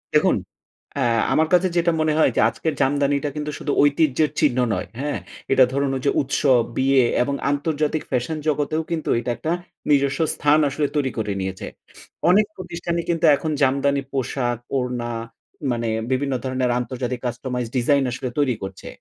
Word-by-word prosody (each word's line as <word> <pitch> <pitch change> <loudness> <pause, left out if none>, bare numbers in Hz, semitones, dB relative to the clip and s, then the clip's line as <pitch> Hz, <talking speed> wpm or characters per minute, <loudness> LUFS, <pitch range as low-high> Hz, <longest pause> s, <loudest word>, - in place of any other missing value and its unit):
দেখুন - - +4 0.6
অ্যা 140 - 0 0.3
আমার 160 0 +3
কাজে 180 +1 +5
যেটা 170 0 +3
মনে 155 -1 +2
হয় 155 - +4
যে - - +3
আজকের 155 +7 -3
জামদানিটা 145 +1 +1
কিন্তু 150 0 -3
শুধু 145 - -2
ঐতিহ্যের 145 0 +3
চিহ্ন 140 -5 +2 0.2
নয়, 90 - -3
হ্যাঁ? 145 +1 -2 0.3
এটা 135 -1 +6
ধরুন 140 0 0
ওইযে 135 +2 0
উৎসব, 135 -2 +3 0.2
বিয়ে 135 -1 +4 0.2
এবং 140 +2 -2 0.2
আন্তর্জাতিক 150 +1 -1
ফ্যাশন 130 +5 -1
জগতেও 150 +1 0
কিন্তু 165 -2 -2
এইটা 120 +1 -2
একটা 160 - -3 0.4
নিজস্ব 140 -1 +2
স্থান 150 +1 +3
আসলে 145 +1 -1
তৈরি 140 -3 +1
করে 105 -2 -1
নিয়েছে। 95 0 -4 0.6
অনেক 205 +4 +5
প্রতিষ্ঠানই 170 -2 -4
কিন্তু 165 -1 +1
এখন 155 +2 -3
জামদানি 140 +1 +2
পোশাক, 125 -2 -1 0.2
ওড়না 125 -2 -2 0.6
মানে 120 -1 -1 0.2
বিভিন্ন 135 +1 0
ধরণের 130 -1 0
আন্তর্জাতিক 125 +1 -3
customized 125 -1 -4
ডিজাইন 140 +3 +3
আসলে 130 +1 -4
তৈরি 135 -4 +2
করছে, 95 -1 -7
140 Hz, 160 wpm, -22 LUFS, 125-150 Hz, 0.6 s, এটা